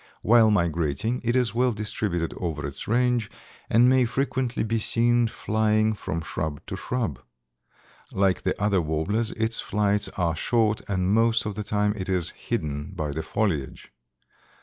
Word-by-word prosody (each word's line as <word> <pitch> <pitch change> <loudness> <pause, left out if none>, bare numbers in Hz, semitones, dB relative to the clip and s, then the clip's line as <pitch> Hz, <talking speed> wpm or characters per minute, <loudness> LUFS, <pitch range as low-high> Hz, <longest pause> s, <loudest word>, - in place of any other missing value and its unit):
While 115 0 +6
migrating 85 - 0
it 120 +1 0
is 125 -5 +2
well 125 +1 +2
distributed 105 -5 -2
over 80 -5 -3
its 70 -1 -5
range, 120 -1 +1 0.4
and 120 +3 +5
may 130 -1 +4
frequently 130 0 -1
be 115 +1 0
seen 120 +1 +3
flying 110 0 +1
from 85 -5 -4
shrub 80 -2 -4
to - - -5
shrub. 110 - -3 0.9
Like 95 -1 +1
the - - -2
other 100 -2 +2
warblers 90 +9 -1
its 115 0 -1
flights 105 0 0
are 85 -3 0
short 110 +4 +1
and 95 -1 0
most 115 +1 +3
of 105 - -3
the 105 - -4
time 105 0 0
it 95 -2 -5
is 90 -3 +1
hidden 75 +4 -4
by 80 -4 -3
the 80 +3 -3
foliage. 80 -5 -2
105 Hz, 155 wpm, -25 LUFS, 85-115 Hz, 0.9 s, While